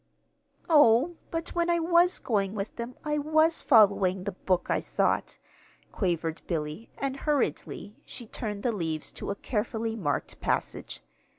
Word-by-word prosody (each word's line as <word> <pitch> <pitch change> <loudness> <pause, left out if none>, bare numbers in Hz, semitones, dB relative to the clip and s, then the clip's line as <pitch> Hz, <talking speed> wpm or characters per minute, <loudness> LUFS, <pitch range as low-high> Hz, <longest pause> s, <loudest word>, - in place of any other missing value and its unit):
"Oh, 295 +1 +5
but 330 0 -3
when 345 0 0
I 340 - +3
was 345 +2 +3
going 200 -4 -1
with 200 0 -4
them 235 +1 -6
I 300 0 0
was 315 +2 +3
following 200 -6 +4
the 200 - -3
book 185 -1 -1
I - - +1
thought," - - 0 0.5
quavered 170 -4 -1
Billy; 155 +5 -3
and 275 -1 -2
hurriedly 275 -7 -2
she 240 - -8
turned 210 -2 -5
the 245 - +2
leaves 160 -7 -3
to - - -7
a 200 - -1
carefully 225 +1 -2
marked 160 -10 -2
passage. - - -2
225 Hz, 150 wpm, -28 LUFS, 195-300 Hz, 0.5 s, Oh